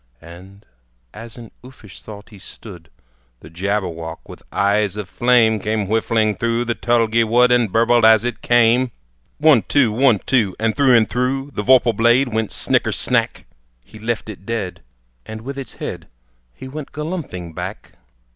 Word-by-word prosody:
And 90 +5 -15 0.5
as 115 +2 -11
in 115 -2 -11
uffish 125 -6 -14
thought 105 -1 -12
he 105 -3 -15
stood, 90 -4 -12 0.5
The 75 - -14
Jabberwock 85 -3 -4
with - - -12
eyes 100 0 0
of 105 -3 -5
flame, 115 0 +2
Came 105 0 -2
whiffling 110 0 0
through 115 +1 -1
the 120 - -1
tulgey 115 -1 +1
wood, 120 +2 +3
And 120 -4 +2
burbled 115 +2 +3
as 110 -1 +6
it 120 -1 -4
came! 120 +1 +3 0.5
One, 150 -6 +5
two! 130 -3 +1
One, 125 0 +3
two! 110 -3 0
And 110 0 0
through, 135 -3 +4
and 115 -2 +4
through 135 +3 -2
The - - -3
vorpal 125 0 +4
blade 120 +4 +3
went 110 -1 -1
snicker - - +1
snack! - - 0 0.4
He 105 - -15
left 115 0 -3
it 105 -3 -10
dead, 100 -6 -5 0.4
and 110 0 -9
with 135 +3 -7
its 135 - -9
head - - -7 0.5
He 130 - -10
went 145 +2 -8
galumphing 150 - -6
back. - - -7
115 Hz, 165 wpm, -19 LUFS, 105-125 Hz, 0.5 s, as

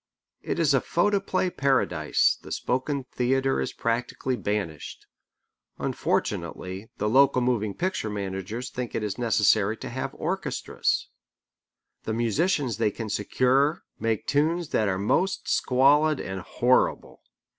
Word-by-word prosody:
It - - -3
is - - +3
a - - +3
photoplay 195 -3 +1
paradise, 125 - +2
the - - -11
spoken 130 +2 -1
theatre 135 +2 +1
is - - -2
practically 120 +2 -2
banished. 100 -9 -4 0.7
Unfortunately 95 +4 -2
the 105 - -1
local 135 +3 +5
moving 110 -5 0
picture 185 -11 -2
managers 100 +4 -4
think 125 -2 -5
it 105 0 -2
necessary 110 -2 +3
to - - -7
have 130 +3 -4
orchestras. 190 +4 -1 1.0
The 110 - -2
musicians 120 - 0
they 110 -2 +2
can 110 +1 -6
secure 130 - +1 0.2
make 115 -2 -1
tunes 160 +3 +1
that 110 - +1
are 95 - 0
most 180 - 0
squalid 145 +4 +3
and 95 0 -5
horrible. 125 +7 +1
125 Hz, 125 wpm, -26 LUFS, 105-140 Hz, 1.0 s, local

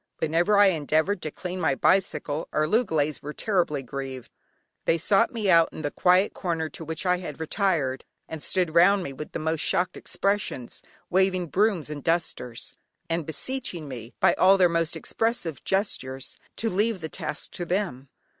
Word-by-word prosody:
Whenever 170 +6 +2
I 205 -1 +7
endeavoured 160 +3 +1
to 155 - -3
clean 180 +3 -6
my - - +2
bicycle, 160 -4 +1
our 155 - +1
loogalays 155 - +1
were 150 +1 -6
terribly 175 -9 0
grieved. 130 -1 -6 0.5
They 165 - +3
sought 195 +6 +3
me 225 -4 -2
out 165 -3 +6
in 155 - -8
the 145 - -1
quiet 185 +2 +3
corner 165 -4 -2
to 165 - -8
which 160 +3 -5
I 180 0 +3
had 155 -5 -7
retired, 160 -6 0 0.2
and 160 -2 -7
stood 180 -2 0
round 185 +3 +5
me 140 - -5
with 150 +3 -8
the - - -1
most 160 0 -1
shocked 180 +2 +1
expressions, 195 - -2 0.3
waving 185 -2 +2
brooms 185 -2 +1
and 145 -2 -6
dusters, 160 -8 -2 0.4
and 165 -2 -1
beseeching 180 - -2
me 120 -2 -8
by - - +5
all 190 +1 +5
their 185 -2 +6
most 165 0 0
expressive 225 -9 -2
gestures 135 -10 -1 0.2
to 225 - -2
leave 205 +1 0
the 160 - -3
task 150 - -5
to 175 - -5
them. 170 -8 -2
170 Hz, 175 wpm, -26 LUFS, 150-190 Hz, 0.5 s, I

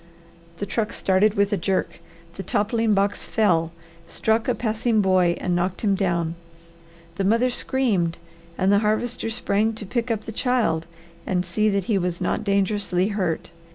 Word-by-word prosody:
The 205 - -3
truck 210 +1 -2
started 195 +3 +2
with 200 +1 +2
a - - +2
jerk. 190 +2 -1 0.3
The 190 - -6
toppling 215 +3 +1
box 200 +1 0
fell, 170 -7 +2 0.4
struck 220 +4 0
a 250 - +1
passing 220 0 0
boy, 185 -3 +3
and 180 - -1
knocked 180 +1 -1
him 205 -3 +2
down. 170 -4 0 0.8
The 195 - 0
mother 230 +6 +2
screamed 205 -11 0 0.4
and 190 +1 +2
the 200 - +5
Harvester 225 +2 -1
sprang 220 -1 0
to 215 -1 -7
pick 235 +4 -2
up 220 -2 -2
the - - -5
child 225 -9 0 0.4
and 180 -1 0
see 215 +5 +1
that 200 -1 0
he 200 +1 +1
was 180 -1 -2
not - - -1
dangerously 200 -2 +1
hurt. 185 -6 -2
200 Hz, 165 wpm, -23 LUFS, 185-220 Hz, 0.8 s, the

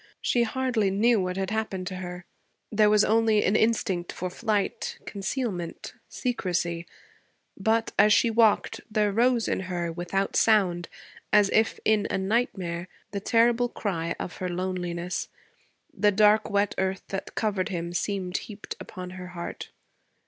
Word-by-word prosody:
She 240 - +1
hardly 235 -3 +1
knew 215 +3 +3
what 180 0 -2
had 190 +1 -2
happened 215 -4 -2
to 185 0 -4
her; 180 -1 -7 0.5
there 210 -1 +4
was 210 0 +5
only 220 -1 +3
an 200 - +2
instinct 205 -6 +1
for 180 0 -4
flight, 210 -1 -1
concealment, 195 -4 -4 0.2
secrecy; 175 -8 -2 0.7
but, 220 +3 +1
as 210 - +7
she 230 +2 +4
walked, 220 -2 +3
there 215 -1 +1
rose 235 +2 +2
in - - 0
her, 175 -2 -3
without 175 +3 -2
sound, 185 -6 +3 0.4
as 205 -1 +5
if 220 0 +2
in 215 -1 +3
a - - 0
nightmare, 190 -4 -1 0.2
the 200 - -2
terrible 235 +3 +3
cry 170 -7 -2
of 175 - -5
her 185 - -3
loneliness. 180 -1 -3 0.6
The 210 - +3
dark 210 +2 +4
wet 200 -1 +1
earth 190 0 -1
that 195 0 -5
covered 205 -3 0
him 170 -2 -4
seemed 185 0 -1
heaped 210 -1 -7
upon 180 -1 -8
her 185 0 -8
heart. 170 - -6
200 Hz, 150 wpm, -27 LUFS, 180-220 Hz, 0.7 s, as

